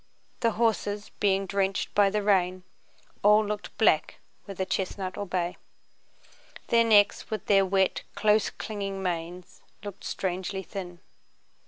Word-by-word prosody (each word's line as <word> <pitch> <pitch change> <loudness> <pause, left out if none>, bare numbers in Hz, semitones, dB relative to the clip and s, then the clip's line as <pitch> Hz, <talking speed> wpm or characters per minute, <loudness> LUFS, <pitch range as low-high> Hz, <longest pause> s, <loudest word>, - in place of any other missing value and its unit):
The 230 -2 +1
horses, 210 -2 -1
being 195 -1 +2
drenched 195 0 -1
by 205 -1 +4
the 210 +1 -1
rain, 185 -2 +2 0.6
all 210 +1 +5
looked 210 0 -5
black 185 -8 +3 0.3
whether 190 -2 -4
chestnut 190 0 -3
or 205 - -5
bay. 180 -1 -2 1.1
Their 230 0 +5
necks, 210 -3 +4
with 215 -2 -4
their 195 -1 +4
wet, 190 0 +1
close 210 +1 +3
clinging 195 -2 -5
manes, 175 0 -5 0.2
looked 205 -2 -8
strangely 190 +1 -3
thin. 180 -3 -8
195 Hz, 130 wpm, -27 LUFS, 185-210 Hz, 1.1 s, all